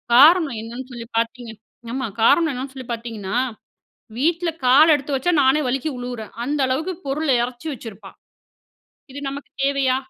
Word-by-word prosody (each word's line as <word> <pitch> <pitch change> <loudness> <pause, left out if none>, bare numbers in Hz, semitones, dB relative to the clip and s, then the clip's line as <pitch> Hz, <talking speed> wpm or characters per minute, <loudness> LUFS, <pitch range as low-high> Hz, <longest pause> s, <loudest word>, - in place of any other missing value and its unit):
காரணம் 305 0 +7
என்னென்னு 240 +4 -8
சொல்லி 235 -1 -8
பாத்திங்கனா 230 -2 -3 0.3
ஆமா 260 -1 -2 0.2
காரணம் 325 +6 +5
என்னென்னு 260 +1 -5
சொல்லி 260 -2 -8
பாத்திங்கன்னா, 230 -3 -5 0.8
வீட்ல 335 +4 +1 0.2
கால் 285 +6 +7
எடுத்து 280 0 -4
வச்சா 270 +7 +1
நானே 265 +3 +4
வலிக்கி 270 +4 -1
உழுவுறேன். 245 -3 -6
அந்த 290 +4 -1
அளவுக்கு 310 +9 -1
பொருள 295 +3 -1
இறைச்சி 245 +5 -6
வச்சிருப்பா 215 -6 -10 1.0
இது 280 - -7
நமக்கு 280 +1 -8
தேவையா? 275 -2 +2
260 Hz, 145 wpm, -22 LUFS, 240-290 Hz, 1.0 s, காரணம்